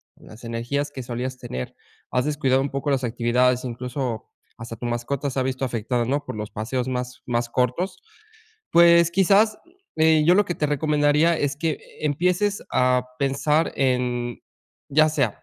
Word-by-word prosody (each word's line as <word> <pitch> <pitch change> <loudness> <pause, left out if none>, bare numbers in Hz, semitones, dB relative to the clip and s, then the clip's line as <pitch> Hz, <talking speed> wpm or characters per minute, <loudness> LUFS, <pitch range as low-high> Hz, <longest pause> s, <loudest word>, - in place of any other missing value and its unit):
con - - -19
las 110 +3 -14
energías 120 +5 -2
que 130 -2 -7
solías 125 +2 -4
tener, 65 - -6 0.4
has 125 0 +1
descuidado 135 -3 +1
un 140 - -2
poco 140 +1 -2
las 135 -1 0
actividades, 125 +1 +1
incluso 125 -1 -4 0.3
hasta 115 0 -7
tu 120 - -7
mascota 120 +4 -2
se 135 - -3
ha - - +1
visto 130 0 -2
afectada, 120 0 -1
¿no?, 145 +4 -1
por - - -6
los 105 0 -5
paseos 125 +4 -3
más 125 -1 -4
más 120 -1 0
cortos, 125 +11 -1 0.7
pues, 170 0 +6
quizás, 200 +4 +3 0.4
eh, 160 -1 +4
yo 175 - +6
lo 205 - +4
que 175 - -3
te 150 - 0
recomendaría 150 +2 +2
es 140 -1 -1
que 160 +2 0
e 155 - -7
empieces 180 +7 0
a 125 0 +2
pensar 140 +3 +1
en 125 -2 0 0.5
ya 155 +2 +4
sea 140 -8 -1
130 Hz, 170 wpm, -23 LUFS, 125-150 Hz, 0.7 s, pues